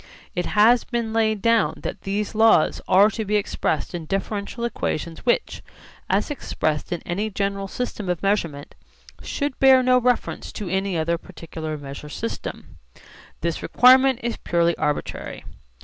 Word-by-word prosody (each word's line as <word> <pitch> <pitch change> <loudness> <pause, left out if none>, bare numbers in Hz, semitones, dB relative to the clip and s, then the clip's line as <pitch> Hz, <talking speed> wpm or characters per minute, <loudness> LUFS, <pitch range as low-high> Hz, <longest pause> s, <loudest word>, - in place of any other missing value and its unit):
It 175 -1 -2
has 225 +3 +5
been 235 -2 -3
laid 220 -2 +1
down 230 -1 +3
that - - -5
these 205 +2 -2
laws 220 -7 +4
are 200 +3 +5
to 220 +2 -3
be 210 0 -1
expressed 195 -6 -1
in 170 -3 -5
differential 200 +5 -3
equations 170 -4 -4
which, 240 - +1 0.5
as - - +1
expressed 155 - -2
in 175 - -3
any 200 +5 -2
general 200 -1 -2
system 210 -3 -4
of 180 0 -2
measurement, 170 -8 -1 0.5
should 285 -2 -3
bear 265 -1 +6
no 250 0 +4
reference 250 -1 -1
to 210 - -5
any 190 0 -1
other 165 +1 0
particular 160 -2 -7
measure 140 +1 -9
system. 230 +9 -6 0.6
This 170 -1 -2
requirement 260 +1 +5
is 235 -1 -2
purely 170 -1 +1
arbitrary. 150 - -3
200 Hz, 150 wpm, -23 LUFS, 170-230 Hz, 0.6 s, bear